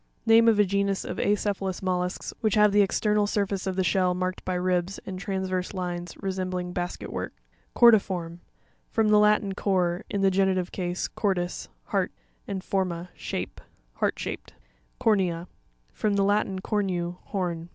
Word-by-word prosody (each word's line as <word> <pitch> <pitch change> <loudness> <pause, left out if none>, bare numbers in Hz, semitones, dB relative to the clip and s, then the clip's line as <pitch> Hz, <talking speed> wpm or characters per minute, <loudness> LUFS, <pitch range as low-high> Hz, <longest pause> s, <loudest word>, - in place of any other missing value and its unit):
Name 225 +1 +6
of 225 -2 +5
a 210 - +5
genus 200 0 0
of - - -5
acephalous 200 -2 0
mollusks 180 0 -2
which 215 -2 +2
have 210 -1 +5
the 205 +1 +5
external 210 +1 +2
surface 200 -2 -1
of 190 - -1
the 190 - +1
shell 180 -1 +2
marked 185 0 -2
by 185 - -2
ribs 180 +1 0
and_ 185 -1 -5
transverse 190 -1 -2
lines, 175 -1 -4
resembling 185 -2 -3
basket 175 0 -4
work - - -4 0.5
(page 240 - +10
84). - - +9 0.4
Cor'pirorm.— 170 - -12 0.5
From 220 -2 +2
the 210 0 +6
Latin 210 -1 +3
cor, 180 -3 0
in 200 - -1
the 195 0 +4
genitive 190 -1 +1
case, 180 -1 -2
cordis, 180 -4 -2
heart, - - -1 0.4
and 190 -2 -4
forma, 180 -3 -2
shape. - - -5 0.3
Heart - - 0
shaped. - - -6 0.4
Cor'NEA.— 180 -5 +1 0.5
From 210 -2 0
the 200 - +3
Latin, 200 -1 +1
cornu, 180 -4 -1
horn. 175 -4 -3
190 Hz, 160 wpm, -26 LUFS, 180-205 Hz, 0.5 s, page